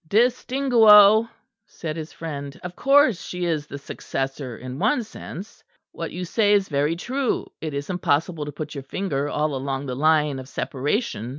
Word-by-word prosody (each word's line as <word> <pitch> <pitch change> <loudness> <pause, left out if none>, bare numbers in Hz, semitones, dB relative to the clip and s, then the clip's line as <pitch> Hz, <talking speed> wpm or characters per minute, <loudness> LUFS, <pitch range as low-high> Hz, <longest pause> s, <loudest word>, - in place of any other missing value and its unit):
"Distinguo," 230 -2 +5 0.4
said 155 -6 -6
his 160 -1 -6
friend. 145 -4 -7
"Of 180 0 -7
course 275 - +4
she 180 -1 -4
is 155 -3 -1
the 140 - -7
successor 135 -3 -5
in 130 +1 -7
one 235 +6 +2
sense: 210 -2 -10 0.3
what - - -6
you 180 - -5
say 205 +3 +2
is 200 -2 +2
very 145 +2 +1
true. 255 +8 -2 0.2
It 155 -2 -4
is 140 0 -4
impossible 165 -2 0
to 145 - -5
put 150 +1 -6
your 140 -2 -6
finger 145 -2 -2
all 150 0 -1
along 135 +1 -3
the 130 -2 -4
line 150 -1 +2
of 130 0 -10
separation. 140 - -2
160 Hz, 170 wpm, -23 LUFS, 140-210 Hz, 0.4 s, Distinguo